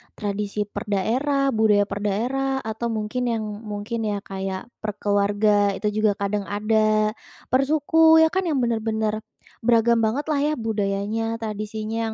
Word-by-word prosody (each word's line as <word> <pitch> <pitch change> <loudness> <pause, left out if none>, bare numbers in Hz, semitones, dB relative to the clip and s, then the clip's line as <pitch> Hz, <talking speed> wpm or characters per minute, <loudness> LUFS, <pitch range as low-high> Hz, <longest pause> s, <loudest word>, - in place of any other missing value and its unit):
tradisi 205 0 -2
per 205 +1 -7
daerah, 270 +8 +1
budaya 215 -3 +4
per 205 0 -5
daerah, 260 +7 -1
atau 220 +2 -3
mungkin 225 +2 -2
yang 230 -2 -1 0.2
mungkin 215 +2 -3
ya 205 -1 -2
kayak 190 +3 -5
per 210 -2 -4
keluarga 205 0 +2
itu 210 +2 -1
juga 215 -2 +3
kadang 200 0 -2
ada, 215 +1 +2 0.4
per 255 +2 +4
suku 320 +2 +5
ya 320 - +3
kan 375 -1 0
yang 285 -6 +1
benar-benar 220 -2 -1 0.4
beragam 235 0 +3
banget 225 +6 +1
lah 290 - +1
ya 295 +2 +1
budayanya, 220 0 -1
tradisinya 215 0 -4
215 Hz, 150 wpm, -23 LUFS, 205-235 Hz, 0.4 s, suku